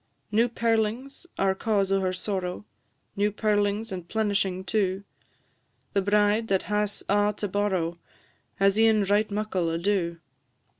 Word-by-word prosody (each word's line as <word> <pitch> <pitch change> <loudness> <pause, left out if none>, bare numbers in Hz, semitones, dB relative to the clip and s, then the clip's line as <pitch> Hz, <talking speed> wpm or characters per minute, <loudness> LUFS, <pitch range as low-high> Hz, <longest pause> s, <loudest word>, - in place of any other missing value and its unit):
New 230 +3 +3
pearlings 230 +7 -1
are 195 0 +2
cause 200 -1 0
o' 195 - +3
her 185 -1 0
sorrow 185 0 -3 0.5
New 205 +1 +1
pearlings 210 +1 0
and 180 -2 -6
plenishing 200 -3 0
too; 195 -1 0 0.9
The 200 - +2
bride 210 +3 +2
that 190 -2 +1
has 210 0 -1
a' 205 +1 +2
to 205 - -2
borrow 185 -4 -1 0.6
Has 195 +2 +3
e'en 220 -2 +4
right 205 +2 +2
muckle 200 -5 -1
ado. 170 0 0
205 Hz, 135 wpm, -26 LUFS, 190-215 Hz, 0.9 s, e'en